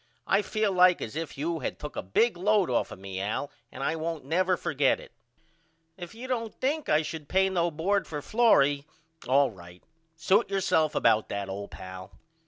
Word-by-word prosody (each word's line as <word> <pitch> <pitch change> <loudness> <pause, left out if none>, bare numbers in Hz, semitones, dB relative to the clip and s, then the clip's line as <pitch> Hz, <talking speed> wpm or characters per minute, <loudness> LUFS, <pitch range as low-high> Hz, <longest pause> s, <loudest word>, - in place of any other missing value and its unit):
I 195 - +3
feel 215 0 0
like 180 -1 +5
as 110 - -6
if 160 -2 -5
you 165 +3 -2
had 130 - -4
took 150 -3 -8
a - - -2
big 215 - +2
load 195 -2 +2
off 120 - +1
of - - -8
me 95 0 -6
Al 110 +8 -3 0.2
and - - -7
I 160 - 0
won't 160 -3 -4
never 180 +4 +1
forget 145 -3 +1
it. - - -13 0.8
If 175 +1 -9
you 245 +3 -8
don't 230 -4 -3
think 295 +3 -1
I 155 +1 +3
should 155 -2 -7
pay 190 0 +3
no 175 -2 +1
bord 185 +6 0
for 150 - -4
Florrie 145 -8 +3 0.4
all 135 0 +4
right. 90 -2 -14 0.3
Suit 190 +7 +2
yourself 160 -5 +1
about 110 - +3
that 100 -1 -4
old 100 +1 -5
pal. 95 +1 -10
160 Hz, 190 wpm, -28 LUFS, 135-190 Hz, 0.8 s, like